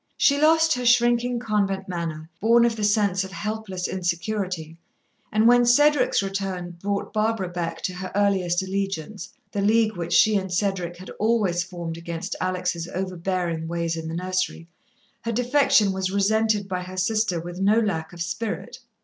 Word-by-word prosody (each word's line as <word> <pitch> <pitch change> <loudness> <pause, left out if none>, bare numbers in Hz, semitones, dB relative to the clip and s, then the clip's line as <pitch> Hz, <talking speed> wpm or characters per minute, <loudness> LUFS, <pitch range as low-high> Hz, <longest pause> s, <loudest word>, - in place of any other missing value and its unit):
She 285 0 +3
lost 320 +1 +5
her 250 - -3
shrinking 240 0 +3
convent 210 -4 -1
manner, 165 -3 -4
born 235 +2 +5
of 235 -1 +1
the 215 - -4
sense 205 -2 +2
of 190 - -8
helpless 210 -4 -4
insecurity, 175 -2 -3 0.5
and 215 +2 +3
when 245 0 +6
Cedric's 290 -1 +4
return 195 -2 -3
brought 200 0 -2
Barbara 215 -3 0
back 165 -2 -4
to 185 - -2
her 185 +1 -6
earliest 190 -3 +2
allegiance 195 0 -4 0.2
the 200 - -2
league 215 +1 +3
which 170 -1 -3
she 215 -1 +5
and 190 -1 -4
Cedric 180 -2 -1
had 185 - -10
always 210 -6 +2
formed 170 -2 -6
against 170 0 -5
Alex' 180 -2 -2
overbearing 180 -3 -2
ways 170 0 -2
in 160 -1 -5
the 165 - -4
nursery 185 -1 -2 0.5
her 230 - -3
defection 245 -3 +3
was 190 0 -2
resented 205 +1 +1
by 185 -1 -3
her 185 +1 -8
sister 200 -2 +1
with 175 +2 -7
no 210 +3 +4
lack 170 -8 -2
of 170 -1 -4
spirit. 215 +6 -4
195 Hz, 165 wpm, -24 LUFS, 175-220 Hz, 0.5 s, when